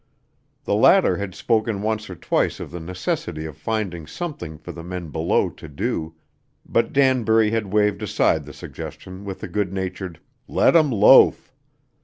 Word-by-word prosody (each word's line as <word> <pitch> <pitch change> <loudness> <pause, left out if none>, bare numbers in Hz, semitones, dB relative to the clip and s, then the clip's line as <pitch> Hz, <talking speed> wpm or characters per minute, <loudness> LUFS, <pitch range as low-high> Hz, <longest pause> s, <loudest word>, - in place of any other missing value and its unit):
The - - -1
latter - - +5
had 100 -3 -5
spoken 110 -3 0
once 110 -1 -2
or 90 - -7
twice - - 0
of - - -7
the 85 - -6
necessity 80 -2 -4
of 80 -3 -7
finding 95 -7 -3
something 115 - -6
for 75 - -9
the 85 - -9
men 90 -1 -6
below 80 +2 +1
to - - -12
do, 80 +2 -3 0.5
but 115 0 +1
Danbury 115 -5 +3
had 110 -4 -2
waved 105 0 +2
aside 105 - +1
the - - -9
suggestion 95 +2 -9
with 95 -2 -7
a - - -3
good 105 -3 -2
natured 95 -2 -5 0.3
"Let - - +3
'em 155 -3 +5
loaf." 105 -4 +5
100 Hz, 165 wpm, -22 LUFS, 85-110 Hz, 0.5 s, latter